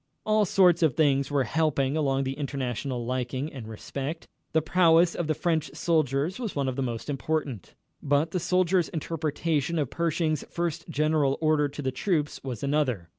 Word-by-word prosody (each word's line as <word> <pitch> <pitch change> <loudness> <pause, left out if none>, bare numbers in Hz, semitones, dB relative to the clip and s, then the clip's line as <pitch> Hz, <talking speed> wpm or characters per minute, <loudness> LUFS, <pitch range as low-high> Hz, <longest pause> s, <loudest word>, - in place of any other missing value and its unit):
All 215 -1 +3
sorts 180 -2 +4
of 155 -6 +3
things 140 -3 +2
were 140 -2 +2
helping 140 +1 0
along 135 -3 +1
the 135 0 -2
international 135 -3 -3
liking 130 +4 -3
and 125 -6 -8
respect. 140 +8 -6 0.2
The 160 - +3
prowess 170 0 +4
of 170 - -3
the 155 - +1
French 160 -3 0
soldiers 155 - 0
was 230 -5 -4
one 140 -2 0
of 130 - -2
the 135 - -2
most 120 -3 -3
important. 145 - -3 0.3
But 145 +3 +1
the 180 - -1
soldiers' 180 0 +2
interpretation 160 -1 -1
of 145 -5 -1
Pershing's 160 -2 0
first 170 -1 -3
general 150 -2 +1
order 155 -2 +2
to 145 +1 -7
the 130 - 0
troops 150 +1 -1
was 130 -3 -5
another. 135 - 0
150 Hz, 175 wpm, -27 LUFS, 135-165 Hz, 0.3 s, sorts